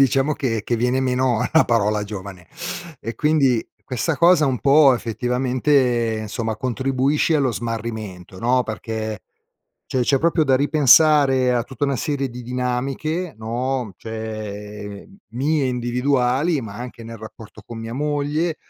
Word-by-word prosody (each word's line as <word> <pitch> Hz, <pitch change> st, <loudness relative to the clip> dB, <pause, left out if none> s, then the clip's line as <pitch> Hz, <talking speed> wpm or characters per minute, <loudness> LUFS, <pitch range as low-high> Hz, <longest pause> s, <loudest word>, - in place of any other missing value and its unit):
diciamo 135 Hz, +2 st, +3 dB
che 120 Hz, -7 st, -2 dB
che 120 Hz, -, -1 dB
viene 125 Hz, +3 st, +1 dB
meno 130 Hz, -3 st, +1 dB
la 160 Hz, -, +6 dB
parola 105 Hz, -3 st, +1 dB
giovane; 95 Hz, -3 st, -8 dB, 0.5 s
e 115 Hz, -, -6 dB
quindi 140 Hz, -6 st, +2 dB, 0.2 s
questa 140 Hz, +5 st, -2 dB
cosa 170 Hz, -2 st, +5 dB
un 130 Hz, -3 st, -1 dB
po' 140 Hz, -1 st, +6 dB
effettivamente, 125 Hz, 0 st, +1 dB
insomma, 110 Hz, +1 st, -3 dB
contribuisce 135 Hz, +5 st, 0 dB
allo 140 Hz, -4 st, +2 dB
smarrimento 110 Hz, -5 st, -5 dB
no, 125 Hz, +4 st, +2 dB
perché 110 Hz, -2 st, -5 dB, 0.6 s
cioè 130 Hz, -, 0 dB
c'è 135 Hz, +2 st, +2 dB
proprio 165 Hz, -1 st, +2 dB
da 135 Hz, -2 st, +3 dB
ripensare 140 Hz, -2 st, +5 dB
a 120 Hz, -, 0 dB
tutta 135 Hz, +2 st, -4 dB
una 140 Hz, -1 st, 0 dB
serie 140 Hz, +1 st, -2 dB
di 125 Hz, +1 st, -8 dB
dinamiche 130 Hz, +7 st, -2 dB
no, 120 Hz, 0 st, -3 dB
cioè 105 Hz, -2 st, -7 dB, 0.2 s
mie 145 Hz, +5 st, 0 dB
individuali, 125 Hz, +4 st, +1 dB
ma 105 Hz, -3 st, -8 dB
anche 120 Hz, 0 st, -8 dB
nel 115 Hz, -1 st, -8 dB
rapporto 110 Hz, 0 st, -11 dB
con 115 Hz, -, -8 dB
mia 115 Hz, +1 st, -6 dB
moglie, 150 Hz, +3 st, -1 dB
125 Hz, 140 wpm, -21 LUFS, 115-140 Hz, 0.6 s, la